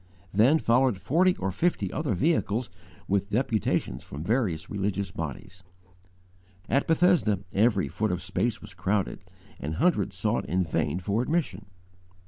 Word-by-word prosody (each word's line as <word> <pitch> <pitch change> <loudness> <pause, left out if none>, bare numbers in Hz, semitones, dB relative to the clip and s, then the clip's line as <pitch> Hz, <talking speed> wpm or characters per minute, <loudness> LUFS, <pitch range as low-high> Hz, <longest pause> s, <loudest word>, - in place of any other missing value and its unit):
Then 120 +10 +5
followed 125 -5 +2
forty 180 - +2
or 95 0 -2
fifty 175 - 0
other 145 -10 -1
vehicles 120 - 0 0.4
with 100 +1 0
deputations 110 -2 0
from 75 +3 -7
various 95 -7 0
religious 100 -1 -2
bodies, 80 +3 -7 1.0
etc. 115 - -2
At 140 - +2
Bethesda, 165 - +3
every 105 -1 +3
foot 110 0 -1
of 90 0 -3
space 120 -2 -1
was 105 -1 -10
crowded, 95 +2 -1 0.4
and 75 +2 -4
hundreds 105 - +1
sought - - 0
in 90 +3 +2
vain 80 0 -1
for 100 +5 0
admission. 160 0 -2
105 Hz, 140 wpm, -27 LUFS, 95-130 Hz, 1.0 s, Then